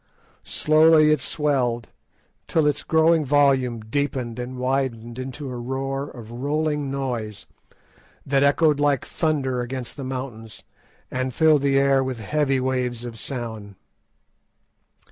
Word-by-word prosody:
Slowly 155 0 +4
it 155 - +2
swelled, 130 -6 0 0.6
till 160 -2 +2
its 145 -1 +1
growing 160 0 +3
volume 135 -4 +2
deepened 125 0 -2
and 125 +1 -5
widened 125 -2 -2
into 130 +1 -6
a 125 - -5
roar 135 +3 -3
of 115 -3 -11
rolling 145 +3 -1
noise, 120 -9 -4 0.8
that 135 0 +2
echoed 145 +1 +3
like 145 -3 +2
thunder 135 -6 -1
against 125 0 -5
the 140 - -5
mountains, 125 -5 -6 0.5
and 130 -1 -2
filled 155 -3 +4
the 140 -1 +2
air 135 -1 +3
with 130 -2 -3
heavy 135 +4 0
waves 125 -2 -2
of 115 -2 -8
sound. 110 -6 -6
135 Hz, 125 wpm, -23 LUFS, 120-145 Hz, 0.8 s, Slowly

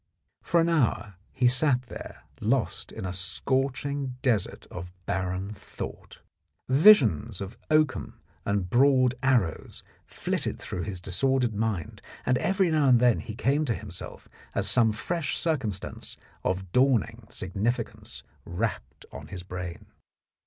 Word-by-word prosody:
For 170 - +2
an 165 - +3
hour 130 -10 +1 0.2
he 125 - +2
sat 125 0 +3
there 120 - -10 0.2
lost - - -1
in - - -6
a 90 - -3
scorching 135 +6 0
desert 115 -8 +1
of 90 0 -7
barren 95 +2 -2
thought. 100 - -9 0.5
Visions 130 - +5
of 100 +3 -6
oakum 155 -2 +1 0.2
and 100 -2 0
broad 130 +3 +4
arrows 120 -12 0 0.2
flitted - - -2
through 90 - -5
his 95 -1 -4
disordered 125 +6 +1
mind, 105 -6 -2 0.2
and 125 -1 +2
every 190 -2 +2
now 155 -3 +3
and 125 -2 +6
then 120 -2 +4
he 110 - -7
came 140 +6 +1
to 115 -5 0
himself 100 -4 -7 0.3
as - - +1
some 115 -3 +4
fresh 160 +8 -2
cir 160 -2 +1
cumstance 110 -8 -5 0.3
of 95 0 -2
dawning 120 -3 +2
significance 100 +6 -3 0.2
rapped 100 +6 -4
on 70 +3 -9
his 90 +1 -7
brain. 90 -1 -6
120 Hz, 135 wpm, -27 LUFS, 95-135 Hz, 0.5 s, and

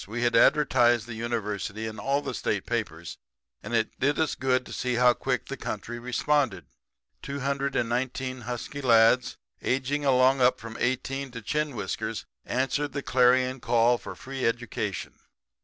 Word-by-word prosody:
We 115 +4 -3
had 120 0 +2
advertised 120 -6 +4
the 120 - -7
University 110 -2 -3
in 110 -1 -6
all 140 +6 0
the - - -4
state - - -2
papers, - - -4 0.4
and 115 +3 -3
it 110 -1 -1
did 140 +3 +2
us 160 - +1
good 130 -1 0
to - - -9
see 125 -1 -1
how 125 0 +5
quick 130 0 -2
the 140 - -5
country 120 +3 -5
responded. 125 - 0 0.6
Two 140 0 -5
hundred 140 0 -1
and - - +1
nineteen 130 +1 -2
husky 125 +4 -5
lads 120 0 +4 0.2
aging 135 +3 0
along 130 0 +4 0.2
from 115 0 -9
18 135 +2 -1
up 125 - -18
to 115 -2 -7
chin 150 +3 -1
whiskers 95 -5 -4 0.2
answered 135 +2 -1
the 140 0 -3
clarion 130 +1 +3
call 120 0 +3
of - - -8
free 135 0 -6
education. 115 0 -2
125 Hz, 165 wpm, -27 LUFS, 115-135 Hz, 0.6 s, how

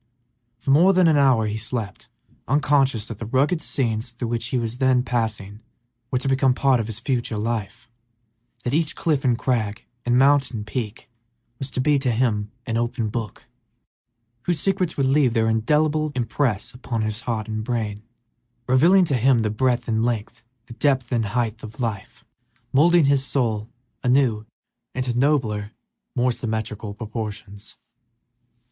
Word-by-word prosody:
For 125 +3 -2
more 175 +7 +6
than 180 -2 +4
an 160 - +4
hour 130 -6 +4
he 105 0 -2
slept, 110 -1 -4 0.4
unconscious 135 -5 +2
that 110 -3 -8
the 115 - -5
rugged 145 +8 +1
scenes 115 -2 -2
through 120 -1 -4
which 115 -1 -2
he 130 - -1
was 115 +1 -3
then 130 -2 +3
passing 110 -4 -3 0.5
were 125 - 0
to 130 - -3
become 135 -1 +3
part 135 -2 +3
of 110 - -2
his 110 -1 -6
future 120 -4 -1
life; 110 -1 -3 0.8
that 120 - -2
each 155 0 +1
cliff 150 -5 0
and 125 -3 +2
crag 115 -4 -1 0.2
and 120 0 +2
mountain 135 -5 +3
peak 110 0 -5 0.5
was 135 - -4
to 130 - -2
be 145 +1 +3
to 135 -1 0
him 110 -3 0
an 115 -1 -1
open 115 -1 -1
book, 110 -1 -5 1.0
whose 175 -3 0
secrets 185 -1 0
would 140 - +2
leave 135 -3 +3
their 110 -1 +2
indelible 150 +7 +1
impress 120 -2 -1
upon 120 -3 -3
his 110 +1 -3
heart 115 -2 -3
and 110 0 -3
brain, 110 -3 -3 0.7
revealing 170 +9 +5
to 150 - -1
him 125 -1 +3
the 105 - 0
breadth 120 +2 0
and 110 -1 +1
length, 120 0 -2 0.2
the 120 - -11
depth 130 -1 0
and 115 -3 +1
height 115 +1 -2
of 110 +1 -10
life, 115 +1 -4 0.5
moulding 165 +3 +5
his 140 -1 +3
soul 115 -6 -1 0.3
anew 125 -4 +2 0.5
into 125 -2 -1
nobler, 120 -6 +1 0.4
more 125 0 +2
symmetrical 110 -3 -4
proportions. 105 -2 -7
120 Hz, 160 wpm, -23 LUFS, 110-135 Hz, 1.0 s, more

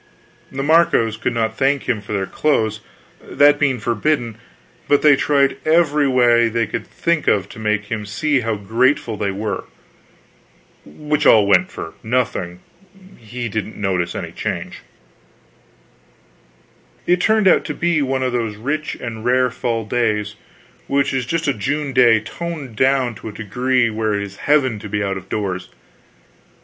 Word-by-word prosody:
The 135 +1 -4
Marcos 145 -8 +3
could 115 +2 -3
not 110 -1 -1
thank 140 0 +2
him 115 -5 -1
for 105 - -11
their 100 -2 -1
clothes, 110 -5 0 0.4
that 145 0 +3
being 135 -4 +1
forbidden; 120 +1 -1 0.5
but 145 - +3
they 150 -2 +7
tried 140 -1 +2
every 150 -3 +3
way 120 -3 +4
they 115 0 0
could 115 - -5
think 170 -2 -1
of 100 -2 +2
to - - -11
make 105 -1 -1
him 105 -2 -3
see 140 +7 0
how 115 -2 -2
grateful 115 +5 0
they 100 -1 -2
were. 100 +1 -4 1.2
Which 150 0 -1
all 105 -2 +6
went 100 -2 +3
for 80 - -7
nothing: 110 -7 -2 0.5
he 120 +2 -6
didn't 110 0 -4
notice 95 -4 -1
any - - -5
change. - - -5 2.3
It 180 0 +2
turned 220 -1 +3
out - - +5
to 150 - -4
be 170 -1 +1
one 135 -1 -1
of 130 - 0
those 115 -3 -2
rich 145 +8 -3
and 115 -2 -6
rare 125 +1 +2
fall 115 -2 -2
days 105 -2 -1 0.5
which 140 0 +1
is 130 -3 -2
just 165 +3 -1
a 140 - +2
June 140 +6 -3
day 120 -3 +5
toned 145 +2 -7
down 130 -1 +2
to 110 - -9
a - - -10
degree 125 +3 0
where 110 -1 -1
it 100 - -2
is 100 -1 -9
heaven 130 -6 +1
to 105 - -9
be 105 0 -1
out 100 -1 -2
of 95 - -11
doors. 95 -3 -3
120 Hz, 160 wpm, -19 LUFS, 105-140 Hz, 2.3 s, they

